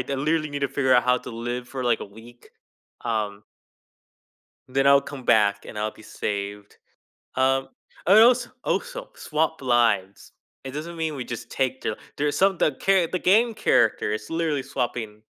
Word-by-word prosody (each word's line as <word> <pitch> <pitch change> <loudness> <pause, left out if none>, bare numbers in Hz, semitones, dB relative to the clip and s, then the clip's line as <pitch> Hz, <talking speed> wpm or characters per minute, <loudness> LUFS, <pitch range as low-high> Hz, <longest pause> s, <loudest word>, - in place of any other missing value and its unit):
literally 155 +2 0
need 145 - -3
to 140 - 0
figure 130 -1 +2
out 125 - +5
how 125 0 +4
to 125 - -9
live 120 +2 -4
for, 130 0 -5
like, 120 -2 +2
a - - -4
week, 115 +4 -16 0.5
um 105 -2 -2 1.2
then 135 +1 +1
I'll 140 0 +7
come 140 -2 -9
back 100 -2 +3
and 105 - -8
I'll 110 +1 -1
be 110 - -17
saved. 100 -1 -5 0.6
Um, 135 +1 +2 0.4
I 195 +4 +7
als 240 +2 +6 0.2
also - - -3
swap 160 0 -1
lives. 115 -6 +1 0.3
It 135 - -6
doesn't 155 +5 -6
mean 160 -2 -2
we 130 - -4
just 120 -1 -7
take 130 -1 -1
the - - -2 0.2
there's 145 0 0
some 195 -1 +3
the 155 - +2
char 185 +5 +2
the 185 - -2
game 225 +7 +4
character 115 - +2
is 105 0 -5
literally 160 -5 -1
swapping 115 -4 -4
130 Hz, 170 wpm, -24 LUFS, 115-155 Hz, 1.2 s, I'll